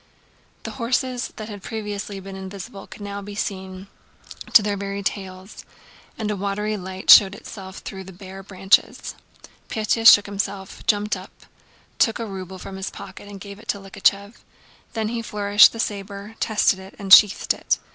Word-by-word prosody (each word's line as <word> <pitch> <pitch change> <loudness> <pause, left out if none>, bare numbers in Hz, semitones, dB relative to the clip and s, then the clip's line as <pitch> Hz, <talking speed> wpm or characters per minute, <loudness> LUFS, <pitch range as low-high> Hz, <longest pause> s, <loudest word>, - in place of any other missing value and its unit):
The - - -5
horses 250 +1 -1
that 215 -2 -7
had 205 -3 -8
previously 205 -2 -5
been 195 0 -9
invisible 190 0 -8
could - - -12
now 200 0 -5
be 200 +1 -9
seen 190 -2 -5 0.7
to 215 - +8
their 205 0 -1
very 200 0 -4
tails, 190 0 -5 0.5
and 215 -2 -2
a - - -1
watery 205 +2 -2
light 190 -1 +1
showed 195 -2 +8
itself 190 -2 -10
through 190 -1 -8
the 190 - -10
bare 190 +1 -10
branches. 190 0 +1 0.6
Pétya 225 0 +6
shook 205 - +5
himself, 200 -1 -5
jumped 210 0 +2
up, - - -13 0.5
took 225 - +3
a 230 - -4
ruble 190 -2 -7
from 190 +1 -8
his 190 0 -4
pocket 195 +1 -11
and 200 -1 -10
gave 200 +1 -10
it - - -16
to - - -1
Likhachëv; 200 +2 0 0.6
then 220 -2 -2
he 235 0 -3
flourished 205 -1 +5
the 230 - -9
saber, 200 0 -4
tested 210 -3 +2
it, 190 +1 -12
and 195 -2 +3
sheathed 210 -1 +7
it. - - 0
200 Hz, 170 wpm, -23 LUFS, 190-210 Hz, 0.7 s, to